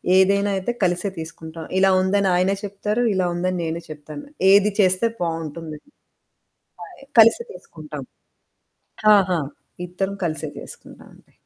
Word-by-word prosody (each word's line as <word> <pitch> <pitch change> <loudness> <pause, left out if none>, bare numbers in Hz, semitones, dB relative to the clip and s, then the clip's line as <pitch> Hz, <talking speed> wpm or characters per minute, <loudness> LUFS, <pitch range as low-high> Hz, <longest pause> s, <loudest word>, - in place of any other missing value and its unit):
ఏదైనా 200 +2 +3
అయితే 190 +5 -2
కలిసే 180 +2 +1
తీసుకుంటాం. 160 0 -8
ఇలా 195 0 +4
ఉందని 195 +1 +1
ఆయనే 185 +2 +2
చెప్తారు, 210 +4 -2
ఇలా 185 -1 +1
ఉందని 180 +1 -1
నేనూ 165 +1 -3
చెప్తాను. 150 -1 -9 0.3
ఏది 205 +1 +5
చేస్తే 185 +2 +3 0.2
బావుంటుంది. 165 -2 -4 1.0
పాయ్ 350 -8 -12 0.2
కలిసి 230 - +6
తీసుకుంటాం. 150 - -10 1.1
ఆహా! 185 -3 +2 0.5
ఇద్దరం 190 +3 -3
కలిసే 155 -2 -3
చేసుకుంటావండి - - -14
185 Hz, 115 wpm, -22 LUFS, 165-200 Hz, 1.1 s, కలిసి